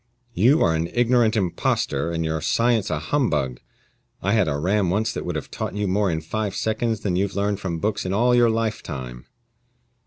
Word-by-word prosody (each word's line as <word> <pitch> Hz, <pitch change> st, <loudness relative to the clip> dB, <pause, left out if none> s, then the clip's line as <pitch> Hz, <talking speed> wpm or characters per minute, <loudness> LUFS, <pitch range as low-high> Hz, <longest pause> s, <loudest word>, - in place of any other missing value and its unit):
"You 125 Hz, -, +4 dB
are 80 Hz, -, +3 dB
an 80 Hz, +1 st, -1 dB
ignorant 120 Hz, -2 st, +3 dB
impostor, 85 Hz, -6 st, 0 dB
and 85 Hz, -1 st, -2 dB
your 80 Hz, 0 st, -2 dB
science 115 Hz, -3 st, +1 dB
a 80 Hz, -, 0 dB
humbug. 75 Hz, -, -1 dB, 0.6 s
I 100 Hz, +2 st, +1 dB
had 105 Hz, -6 st, +3 dB
a 70 Hz, -1 st, 0 dB
ram 95 Hz, +4 st, +1 dB
once 110 Hz, +4 st, 0 dB
that -, -, -5 dB
would 90 Hz, -, -2 dB
have 75 Hz, -, -5 dB
taught -, -, -4 dB
you 105 Hz, -1 st, -1 dB
more 100 Hz, +1 st, +1 dB
in 80 Hz, -2 st, -1 dB
five 105 Hz, +5 st, -3 dB
seconds 110 Hz, 0 st, -1 dB
than 95 Hz, -4 st, -1 dB
you've 95 Hz, +2 st, -1 dB
learned 100 Hz, 0 st, 0 dB
from 90 Hz, -4 st, -3 dB
books 105 Hz, +6 st, -1 dB
in 95 Hz, -, -3 dB
all 120 Hz, +5 st, +3 dB
your 120 Hz, -1 st, +5 dB
lifetime." 80 Hz, -, -3 dB
100 Hz, 195 wpm, -23 LUFS, 80-110 Hz, 0.6 s, your